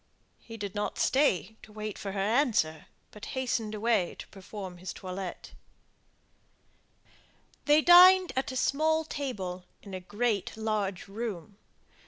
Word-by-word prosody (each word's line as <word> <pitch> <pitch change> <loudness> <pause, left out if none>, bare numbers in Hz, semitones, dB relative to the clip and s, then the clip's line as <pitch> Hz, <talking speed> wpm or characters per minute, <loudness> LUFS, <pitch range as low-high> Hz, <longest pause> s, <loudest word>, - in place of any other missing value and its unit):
He 225 -1 -11
did 200 -2 -5
not 210 0 -3
stay 220 -6 +1
to 215 - -15
wait 215 -1 -5
for 195 -1 -6
her 195 - -3
answer, 205 - +1 0.2
but 210 - -10
hastened 230 -4 -1
away 215 -4 +1
to - - -9
perform 195 -2 -9
his 185 0 -6
toilette. 185 -1 -7 2.1
They 295 +1 +5
dined 365 +1 +8
at 265 0 -1
a - - -7
small 315 +5 +1
table 190 - -5 0.2
in 200 - -10
a 185 - -4
great 205 +2 -2
large 210 -4 -2
room. 205 -2 -6
215 Hz, 135 wpm, -29 LUFS, 195-260 Hz, 2.1 s, dined